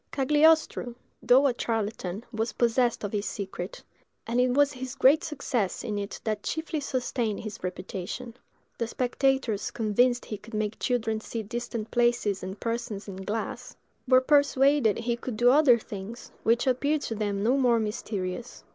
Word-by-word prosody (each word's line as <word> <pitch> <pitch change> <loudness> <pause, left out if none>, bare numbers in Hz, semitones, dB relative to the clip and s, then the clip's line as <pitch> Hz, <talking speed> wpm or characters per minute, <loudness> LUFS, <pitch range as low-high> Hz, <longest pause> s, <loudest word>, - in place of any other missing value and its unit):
Cagliostro, 295 -3 +3 0.3
though 260 +3 +5
a 270 - +3
charlatan, 215 -4 -3
was 225 0 -2
possessed 240 0 +1
of 205 - -3
this 205 -1 -2
secret, 190 -2 -6 0.4
and 240 +2 +1
it 250 - +3
was 290 0 +4
his 260 -1 -6
great 280 +4 +5
success 255 -9 -2
in 210 -2 -2
it 200 +1 -5
that 215 -2 -2
chiefly 320 +3 -3
sustained 250 -6 -2
his 215 -2 -7
reputation; 185 +6 -5 0.5
the 230 - 0
spectators, 255 -3 0
convinced 240 +3 +1
he 210 - -6
could 225 +1 -10
make 215 0 -2
children 225 -3 0
see 225 0 -5
distant 230 0 -5
places 240 -5 +1
and 190 +2 -6
persons 230 -3 -3
in 195 -2 -7
glass, 225 +6 -4 0.3
were 255 0 +6
persuaded 280 -4 +4
he 235 0 -1
could 240 -1 -6
do 245 +2 +5
other 275 -4 +6
things, 215 +1 -8
which 230 +2 +2
appeared 280 +4 +1
to 225 - -3
them 205 -2 -2
no 245 +5 +3
more 245 -4 +3
mysterious. 210 0 -4
235 Hz, 160 wpm, -27 LUFS, 210-255 Hz, 0.5 s, were